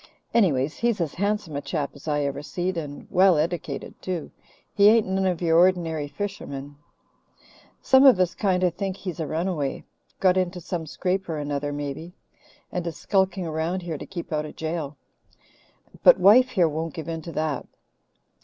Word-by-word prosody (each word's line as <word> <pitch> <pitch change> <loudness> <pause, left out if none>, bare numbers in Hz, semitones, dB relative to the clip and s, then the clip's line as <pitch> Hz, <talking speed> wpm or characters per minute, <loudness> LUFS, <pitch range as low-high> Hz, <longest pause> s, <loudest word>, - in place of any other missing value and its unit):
Anyways, 155 - +2
he's 235 -3 0
as 165 -4 -1
handsome 200 -4 -2
a 140 - -2
chap 150 -4 -3
as 140 +2 -14
I 150 -1 +1
ever 140 0 -2
seed, 180 +5 -3
and 145 -3 -6
well 185 -1 +5
eddicated 155 -2 -2
too. 180 -4 -4 0.4
He 205 0 +6
ain't 225 0 +4
none 190 0 0
of 180 -1 -1
your 165 0 +4
ordinary 170 -4 +2
fishermen. 145 -5 -6 1.1
Some 265 +1 +6
of 250 -8 +7
us 180 -2 +2
kind 185 -3 0
of 180 -2 +2
think 195 +1 -3
he's 180 -5 -6
a 160 - -2
runaway 160 -4 -2 0.4
got 185 -1 +4
into 180 -1 -1
some 170 -2 -5
scrape 185 +4 -2
or 160 - -2
another, 145 0 -2
maybe, 145 +4 -5 0.6
and 175 -1 -3
is 165 - -5
skulking 190 -2 0
around 165 +3 -2
here 165 -4 -4
to - - -7
keep 170 -4 -6
out 150 0 0
of - - -11
jail. 155 -3 -4 1.0
But - - +7
wife 250 +6 +7
here 185 -9 +3
won't 160 +1 -4
give 160 -3 -6
in 165 -1 -4
to 165 - -8
that." 155 -2 -2
170 Hz, 180 wpm, -25 LUFS, 150-190 Hz, 1.1 s, of